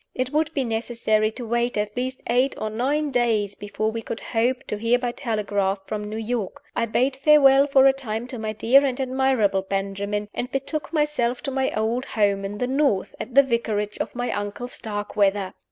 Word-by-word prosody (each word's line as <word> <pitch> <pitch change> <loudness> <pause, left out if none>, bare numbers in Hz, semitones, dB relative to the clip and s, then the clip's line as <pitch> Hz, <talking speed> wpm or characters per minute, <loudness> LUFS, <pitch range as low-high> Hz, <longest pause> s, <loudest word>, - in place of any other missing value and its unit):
It 255 0 -2
would 310 0 +1
be 275 - +1
necessary 225 -2 0
to 245 - -6
wait 235 +1 0
at 210 0 -2
least 255 +1 -3
eight 250 +3 +2
or 215 - -3
nine 285 +6 0
days 225 -5 +1
before 205 +2 -3
we 225 0 -4
could 225 - -5
hope 245 +3 0
to 210 - -3
hear 230 +2 +3
by 245 -1 -2
telegraph 205 -6 -1
from 210 0 -4
New 210 +1 -5
York. 225 -2 -3
I 230 - 0
bade 260 +4 +1
farewell 275 -1 +6
for 270 -1 +5
a 270 - +6
time 235 -4 -4
to 250 - -6
my 215 0 -2
dear 240 +6 +4
and 265 -2 -1
admirable 260 -7 +1
Benjamin, 200 +2 -3
and 250 - -4
betook 275 +3 -3
myself 295 -6 0
to 275 - -2
my 265 0 0
old 230 +4 0
home 200 -5 +1
in 200 +1 -4
the 250 - 0
North, 265 -6 +1
at 255 - -7
the 275 - +8
vicarage 215 -5 -1
of - - -4
my 245 0 -2
uncle 205 +4 -4
Starkweather. 205 -4 -1
235 Hz, 200 wpm, -24 LUFS, 210-265 Hz, -, the